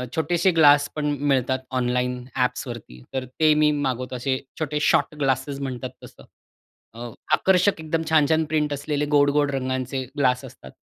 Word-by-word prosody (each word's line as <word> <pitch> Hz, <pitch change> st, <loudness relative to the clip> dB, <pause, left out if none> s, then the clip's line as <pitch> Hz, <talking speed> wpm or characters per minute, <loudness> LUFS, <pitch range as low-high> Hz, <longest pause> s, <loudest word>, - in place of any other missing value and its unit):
छोटेसे 175 Hz, +3 st, +1 dB
ग्लास 145 Hz, -2 st, +5 dB
पण 150 Hz, -1 st, -2 dB
मिळतात 130 Hz, -2 st, +1 dB, 0.2 s
ऑनलाईन 125 Hz, 0 st, -1 dB
ॲप्सवरती, 120 Hz, -, -3 dB
तर 130 Hz, -1 st, -2 dB
ते 155 Hz, +5 st, +2 dB
मी 150 Hz, 0 st, +3 dB
मागवतो 130 Hz, -3 st, -2 dB
असे 130 Hz, +1 st, -1 dB, 0.2 s
छोटे 150 Hz, -1 st, -2 dB
शॉर्ट 150 Hz, -, +2 dB
ग्लासेस 135 Hz, 0 st, -1 dB
म्हणतात 130 Hz, -3 st, -4 dB
तसं. -, -, -14 dB, 1.1 s
आकर्षक, 190 Hz, 0 st, +3 dB
एकदम 160 Hz, +1 st, -2 dB
छान-छान 160 Hz, 0 st, +3 dB
प्रिंट 150 Hz, -1 st, -1 dB
असलेले, 145 Hz, +1 st, -2 dB
गोड-गोड 145 Hz, 0 st, +3 dB
रंगांचे 130 Hz, 0 st, -2 dB
ग्लास 130 Hz, -1 st, +1 dB
असतात. 120 Hz, -, -13 dB
140 Hz, 140 wpm, -23 LUFS, 130-150 Hz, 1.1 s, ग्लास